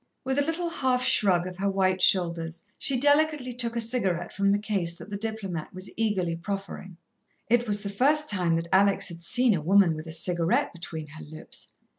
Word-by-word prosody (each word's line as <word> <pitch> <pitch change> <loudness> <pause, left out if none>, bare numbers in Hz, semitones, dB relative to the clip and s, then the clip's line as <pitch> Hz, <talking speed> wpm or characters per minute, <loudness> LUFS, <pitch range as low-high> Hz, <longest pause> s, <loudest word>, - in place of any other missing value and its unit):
With 265 +2 0
a - - +3
little 330 +3 -2
half 255 -5 0
shrug 195 -8 +3
of 185 -1 -7
her 200 +1 0
white 190 -1 +1
shoulders 170 -2 +1
she 265 -3 +2
delicately 290 -2 +2
took 235 -1 -2
a - - 0
cigarette 195 -7 0
from 200 0 +2
the 200 - +3
case 195 -5 -2
that 205 - -11
the - - -3
diplomat 200 -6 -4
was 185 +1 -6
eagerly 195 -6 0
proffering. 190 0 -6 0.5
It 240 0 +3
was 205 -1 +2
the 200 - -3
first 290 +9 +2
time 180 -5 +1
that 165 +1 -2
Alex 195 0 +3
had 170 -1 -10
seen 245 +6 +2
a 170 - -1
woman 185 +1 +4
with 155 +1 -7
a - - -6
cigarette 170 +1 0
between 165 -2 -7
her 155 +1 -10
lips. 155 +1 -8
195 Hz, 200 wpm, -27 LUFS, 175-240 Hz, 0.5 s, woman